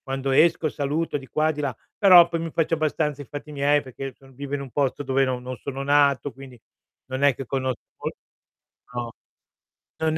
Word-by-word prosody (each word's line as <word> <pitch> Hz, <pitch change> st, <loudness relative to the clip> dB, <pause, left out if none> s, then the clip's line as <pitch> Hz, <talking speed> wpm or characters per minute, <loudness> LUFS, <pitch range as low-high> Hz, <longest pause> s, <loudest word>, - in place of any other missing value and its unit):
Quando 135 Hz, 0 st, -2 dB
esco 160 Hz, +3 st, +4 dB
saluto 145 Hz, +3 st, -1 dB
di 135 Hz, -2 st, -11 dB
qua 155 Hz, +3 st, +1 dB
e -, -, 0 dB
di 150 Hz, -, -4 dB
là, 135 Hz, -5 st, -2 dB, 0.2 s
però 180 Hz, -4 st, +8 dB
poi 170 Hz, -1 st, -2 dB
mi 165 Hz, 0 st, -3 dB
faccio 165 Hz, +1 st, 0 dB
abbastanza 150 Hz, -2 st, 0 dB
i -, -, -8 dB
fatti 145 Hz, +4 st, -8 dB
miei, 145 Hz, 0 st, +2 dB
perché 135 Hz, +1 st, -7 dB
so 135 Hz, 0 st, -18 dB
vivo 140 Hz, +2 st, -5 dB
in 140 Hz, -, -4 dB
un 135 Hz, -2 st, -8 dB
posto 140 Hz, +1 st, 0 dB
dove 135 Hz, 0 st, +2 dB
no 130 Hz, -1 st, -1 dB
non 125 Hz, +1 st, -6 dB
sono 135 Hz, +1 st, -5 dB
nato, 140 Hz, -1 st, +3 dB
quindi 130 Hz, -2 st, -12 dB, 0.5 s
non 130 Hz, +1 st, -4 dB
è 140 Hz, -3 st, +4 dB
che 135 Hz, -, -6 dB
conosc 130 Hz, -1 st, -2 dB, 0.2 s
mol -, -, -4 dB, 0.8 s
No, 120 Hz, -1 st, -4 dB, 0.9 s
non 160 Hz, 0 st, 0 dB
140 Hz, 205 wpm, -24 LUFS, 135-150 Hz, 0.9 s, però